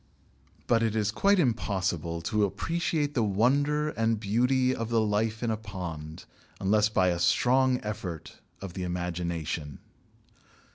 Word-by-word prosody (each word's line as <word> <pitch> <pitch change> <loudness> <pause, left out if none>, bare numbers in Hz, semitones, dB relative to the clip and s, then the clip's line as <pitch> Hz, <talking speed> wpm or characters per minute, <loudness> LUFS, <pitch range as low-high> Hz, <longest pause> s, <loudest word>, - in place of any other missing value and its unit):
But 115 -1 +3
it 110 -1 0
is 110 -1 +1
quite 200 - +3
impossible 95 - -1
to 105 +4 +1
appreciate 150 - -1
the 125 - +1
wonder 140 +9 +2
and 115 -5 0
beauty 125 +5 +2
of 115 -2 -4
the 115 -1 +2
life 110 +1 0
in 115 - +1
a 110 - -1
pond 85 -7 -7 0.3
unless 105 +2 +3
by 95 -3 +2
a 85 -1 -1
strong 130 +6 +3
effort 100 -6 -6 0.2
of 95 -3 -7
the 95 - -5
imagination. 85 -4 -3
110 Hz, 140 wpm, -28 LUFS, 90-125 Hz, 0.3 s, But